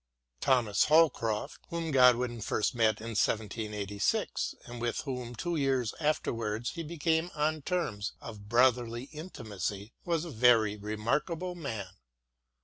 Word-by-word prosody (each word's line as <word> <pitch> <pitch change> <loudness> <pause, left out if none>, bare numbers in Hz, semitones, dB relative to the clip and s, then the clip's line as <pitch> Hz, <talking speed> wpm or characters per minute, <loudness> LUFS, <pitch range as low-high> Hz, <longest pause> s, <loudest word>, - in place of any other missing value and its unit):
Thomas 120 - +3
Holcroft, 145 -9 +2
whom 165 -2 -3
Godwin 125 -3 +4
first 105 - 0
met 110 -3 +2
in 115 - -5
1786, 105 -1 -1
and 120 0 -8
with 120 -1 -1
whom 125 -4 -5
two 170 +9 -2
years 135 -5 +1
afterwards 115 -7 -1
he 170 - -5
became 160 +1 0
on 155 +1 0
terms 145 - -2
of 105 -3 -10
brotherly 120 -1 +3
intimacy, 110 - -5
was 170 -1 0
a 170 - -6
very 115 -4 +4
remarkable 135 - -2
man. 115 - -5
120 Hz, 125 wpm, -30 LUFS, 110-150 Hz, -, Godwin